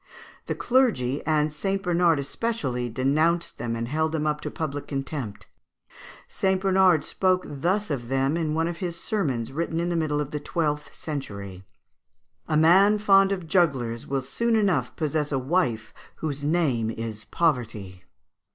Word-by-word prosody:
The - - -1
clergy, 210 - +1
and 155 -1 +2
St. 195 +5 -2
Bernard 175 -3 +3
especially, 140 - -2
denounced 155 +8 +1
them 115 0 -2
and 115 0 -3
held 160 +4 0
them 155 -1 -1
up 150 0 0
to - - -4
public 145 -3 -4
contempt. 135 -6 -5 0.8
St. 190 -1 0
Bernard 190 -4 +4
spoke 185 -1 +1
thus 175 +8 -1
of 120 -4 -3
them 135 +3 +1
in 160 -2 -1
one 165 +1 +1
of 170 0 -4
his 175 -2 -4
sermons 135 - -1
written 165 +2 -2
in 170 +1 -1
the 175 - -1
middle 155 -3 0
of 150 -1 -3
the 150 - -3
twelfth 150 -2 -2
century: 100 - -6 0.8
"A 155 - +1
man 190 +7 +6
fond 195 -2 +5
of 185 -4 -3
jugglers 135 -10 +1
will 135 -1 -1
soon 235 - 0
enough 205 -4 +1
possess 155 -2 -1
a 135 - +1
wife 130 -5 0 0.2
whose 145 -3 -4
name 145 -8 +1
is 110 -1 -5
Poverty. 115 - -1
155 Hz, 160 wpm, -25 LUFS, 130-175 Hz, 0.8 s, man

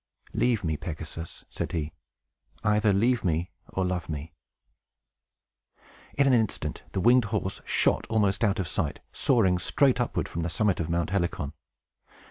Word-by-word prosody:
"Leave 120 -5 +2
me, 80 -2 0
Pegasus!" 80 +1 -7
said - - -4
he. 80 -2 -2 0.7
"Either 105 0 +3
leave 120 +5 +2
me, 85 0 0 0.2
or 95 - -1
love 90 -2 -2
me." 75 0 -5 1.8
In 140 - +4
an 135 - +4
instant, 110 -4 0
the - - 0
winged 120 +2 +5
horse 95 -1 -2
shot - - +2
almost 100 -2 +2
out 105 -1 +3
of 95 -5 -1
sight, - - -2
soaring 95 -9 +3
straight 125 +7 +2
upward 120 - -1
from 85 - -4
the 85 - -1
summit 100 +4 +1
of 85 - -2
Mount 85 0 0
Helicon. 85 -6 -1
95 Hz, 150 wpm, -27 LUFS, 85-110 Hz, 1.8 s, winged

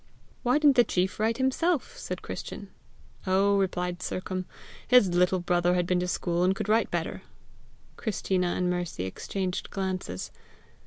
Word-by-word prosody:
"Why 250 +3 +3
didn't 290 -3 +5
the 240 - +8
chief 185 -3 -1
write 225 +1 +1
himself?" 270 +4 0
said - - -6
Christian. - - -7 0.6
"Oh," 195 +2 +3
replied 180 -1 -1
Sercombe, 185 0 -3 0.4
"his 250 -6 +6
little 180 +1 +3
brother 175 0 +2
had 180 -1 +1
been 180 0 +1
to 180 - -1
school, 175 -1 0
and 185 +1 +3
could 195 - -4
write 220 +2 +3
better!" - - -3 0.8
Christina 190 -4 0
and 180 +1 0
Mercy 175 - -2
exchanged 185 - -3
glances. 185 - -3
185 Hz, 150 wpm, -28 LUFS, 180-210 Hz, 0.8 s, the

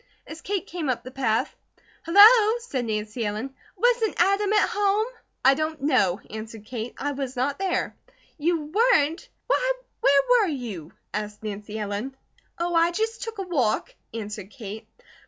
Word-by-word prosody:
As 315 +2 -9
Kate 395 -2 -2
came 330 -5 -4
up 240 -2 -1
the 255 - -9
path: 235 -5 0 0.5
"Hello!" 430 +5 +8
said 280 - -4
Nancy 215 +1 -3
Ellen. 215 +6 -3 0.2
"Wasn't 470 -2 +2
Adam 395 +3 +3
at 425 - +3
home?" 415 +1 +2 0.4
"I 265 - +8
don't 310 +2 -2
know," 215 -10 +2
answered 220 0 -8
Kate. 230 0 -6
"I 290 - -2
was 270 -2 -4
not 275 +5 -1
there." 385 -2 -1 0.4
"You 330 +2 +1
weren't? 355 +1 +2 0.2
Why, - - +2 0.3
where 280 0 +5
were 485 -5 +5
you?" 220 - -5 0.2
asked 210 0 -5
Nancy 210 0 -5
Ellen. 215 +6 -4 0.4
"Oh, 345 +1 -1
I 335 0 +4
just 445 +6 -2
took 455 -1 -5
a 390 - -2
walk!" 270 - 0 0.2
answered 210 -3 -6
Kate. 220 -3 -9
280 Hz, 155 wpm, -25 LUFS, -, 0.5 s, Hello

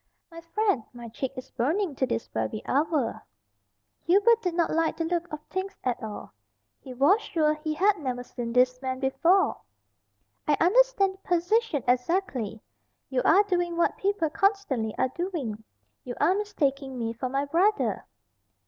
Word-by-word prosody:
"My 335 0 -10
friend, 335 - 0
my 240 -1 -9
cheek 255 +3 -4
is 255 - -8
burning 315 - 0
to 260 - +1
this 115 - -2
very 110 - -3
hour." 290 -3 0 0.8
Hubert 425 +6 +5
did 360 -4 -2
not 340 -1 +1
like 330 0 +1
the 330 - -1
look 345 +1 -2
of 305 - -4
things 380 +3 -5
at 250 -2 -1
all. 215 -1 -7 0.5
He 265 - -11
was 285 - +3
sure 305 -2 +1
he 310 0 -4
had 395 +5 +3
never 250 -4 -3
seen 240 -1 -6
these 250 +1 +3
men 260 -1 -3
before. 335 +8 +2 0.9
"I 295 -2 +3
understand 405 0 +4
the - - -18
position 355 - +1
exactly. 250 - 0 0.5
You 255 -1 +1
are 400 - +6
doing 350 -4 -1
what 340 - +2
people 390 -6 0
constantly 325 - 0
are 260 - +1
doing 270 - -4 0.4
you 245 -1 -6
are 360 - +4
mistaking 280 -10 -1
me 230 -1 -2
for 250 +2 -4
my 275 +2 -1
brother." 370 +9 +1
310 Hz, 160 wpm, -27 LUFS, 255-375 Hz, 0.9 s, are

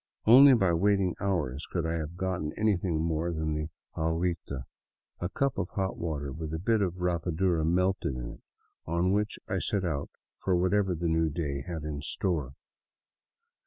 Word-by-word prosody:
Only 130 +4 +9
by 95 -6 +3
waiting 95 +1 +2
hours 80 -8 -1
could 85 -2 -2
I 80 - 0
have 80 +1 -4
gotten 90 -5 -2
anything 95 -7 +1
more 85 +1 0
than 80 -1 -1
the 75 +1 -3 0.2
" - - -43
aguita," 80 -4 -1 0.6
a 90 - -2
cup 135 +2 0
of 90 -1 -2
hot 95 -1 -1
water 75 -4 -3
with 80 +2 -5
a - - -1
bit 110 +6 +1
of 90 -3 0
rapadura 90 -1 0
melted 90 -2 +1
in - - -5
it, - - -13 0.5
on 85 +3 +1
which 105 +1 0
I - - -1
set 100 -2 -1
out 80 -5 -2 0.3
for 95 - +1
whatever 95 +1 +2
the 85 +1 -2
new 80 0 +2
day 70 -3 -3
had 80 0 -5
in 75 -2 -4
store. 75 - -2
85 Hz, 175 wpm, -29 LUFS, 80-95 Hz, 0.6 s, Only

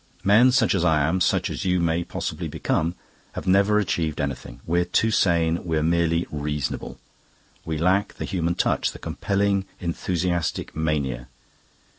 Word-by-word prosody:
"Men 115 +6 +6
such 125 -2 +3
as 95 -3 +1
I 75 -4 +3
am, 90 +3 0
such - - +1
as - - -4
you 90 -1 +1
may 85 0 +1
possibly - - -4
become, 85 +2 -1 0.4
have - - -6
never 100 +3 +4
achieved 85 -6 -1
anything. 70 -4 -4
We're 85 +2 +2
too 110 +5 +1
sane; 85 -4 +2
we're 80 -3 0
merely 85 +1 +1
reasonable. 75 -2 -3 0.7
We 80 -1 -2
lack 95 +5 +1
the - - -5
human 85 -2 -1
touch, - - 0
the - - -9
compelling 100 -1 0
enthusiastic 85 0 -2
mania. 70 -6 -1
85 Hz, 150 wpm, -24 LUFS, 80-95 Hz, 0.7 s, Men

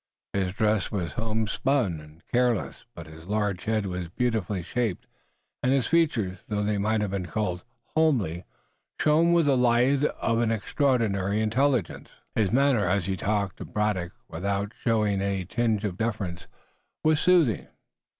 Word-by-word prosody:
His 95 -2 -1
dress 110 -3 +1
was 90 -7 -2
homespun 110 - 0
and 75 +2 -16
careless, 120 -4 0
but 85 - -8
his 80 0 -12
large 105 -3 -1
head 110 -2 0
was 90 -2 -4
beautifully 105 -3 -1
shaped, 115 -2 -2 0.6
and 125 - +2
his 135 -3 +2
features, 115 - +1
though 105 -1 -1
they 105 0 0
might 110 +1 +1
have 105 -2 -1
been 95 -2 -3
called 90 -4 -2 0.3
homely, 115 - +2 0.6
shone 160 +3 +4
with 170 -2 +4
the 140 -2 +4
light 125 +3 +3
of 115 -5 0
an 115 -1 +2
extraordinary 110 -4 +1
intelligence. 120 - 0 0.2
His 105 -4 +1
manner 130 -5 +3
as 90 0 +1
he 95 +1 -1
talked 100 +1 -1
to - - -7
Braddock, 105 -5 -1
without 100 +4 -2
showing 105 -4 +1
any 100 -2 -1
tinge 110 +1 0
of 95 -3 -4
deference, 105 -6 -3 0.6
was 155 -1 +3
soothing. 170 - +3
105 Hz, 150 wpm, -26 LUFS, 95-125 Hz, 0.6 s, shone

